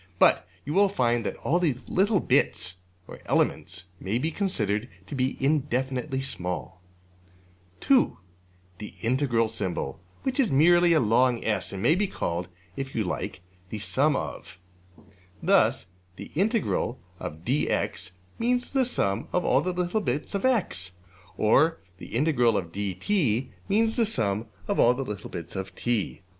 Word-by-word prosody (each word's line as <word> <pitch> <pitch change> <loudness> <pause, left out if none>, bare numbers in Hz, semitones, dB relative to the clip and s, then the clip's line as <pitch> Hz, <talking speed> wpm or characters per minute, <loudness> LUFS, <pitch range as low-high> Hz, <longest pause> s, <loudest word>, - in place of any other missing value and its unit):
But - - +4 0.2
you 145 - -3
will 200 +2 +5
find 120 - +1
that - - -4 0.2
these 135 -7 -1
little 200 +2 +2
bits 90 - +1 0.3
(or - - -10
elements) 90 +4 0 0.2
may 100 +5 -1
be 155 +6 -1
considered 115 - -1 0.2
to - - -9
be 130 -1 0
indefinitely 135 -1 0
small. 90 -5 -5 1.0
(2) 270 -2 +3 0.6
$\ds\int$ 115 +5 -2 1.0
which 265 0 -2
is 250 -6 +3
merely 175 +5 +5
a 160 - +5
long 120 +1 +3
$S$, 110 -2 0
and 95 0 -5
may 135 - +5
be 200 +4 +1
called 85 - -3 0.3
(if 135 0 -5
you 110 - +1
like) 90 -1 -4 0.3
``the 110 - -4
sum 140 +7 +2
of.'' 90 - -5 0.9
Thus 160 - +3 0.3
$\ds\int 200 +8 -1
dx$ 90 - -2 0.3
means 245 +2 0
the 270 -2 +2
sum 100 - -1
of 180 - 0
all 135 - +4
the 185 +4 -1
little 180 +4 0
bits 145 0 -2
of~$x$; 200 - +1 0.4
or 155 +10 +4 0.2
$\ds\int 135 +7 -1
dt$ 110 - +1 0.2
means 220 +2 +2
the 230 -2 +3
sum 110 - -1 0.2
of - - 0
all 120 +1 +5
the 135 - -2
little 105 -4 -6
bits 85 +2 -7
of~$t$. 100 +2 -2
130 Hz, 135 wpm, -27 LUFS, -, 1.0 s, will